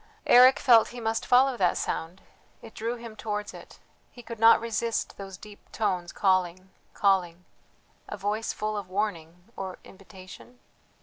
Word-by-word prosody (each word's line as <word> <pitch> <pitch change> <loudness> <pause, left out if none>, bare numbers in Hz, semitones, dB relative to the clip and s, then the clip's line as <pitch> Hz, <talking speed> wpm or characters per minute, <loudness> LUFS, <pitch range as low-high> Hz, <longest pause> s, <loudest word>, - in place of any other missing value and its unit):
Eric 255 +2 +7
felt 235 -4 +5
he 245 - -10
must 225 -1 -3
follow 260 +1 +4
that 185 -4 +1
sound; 170 +4 -4 0.4
it 225 - -12
drew 230 +2 -4
him 230 -2 -10
towards 210 -1 -5
it; - - -13 0.3
he 245 - -14
could 230 -1 -9
not 225 +1 +6
resist 230 0 -3
those 195 -1 -9
deep 210 0 -15
tones 185 -5 -2
calling, 185 -1 0 0.2
calling.... 180 -3 0 0.6
A - - -6
voice 205 +3 -2
full 215 0 -4
of 200 -3 -6
warning 180 -4 -4
or 190 -1 -6
invitation?... 190 +5 -15
210 Hz, 150 wpm, -26 LUFS, 185-230 Hz, 0.6 s, Eric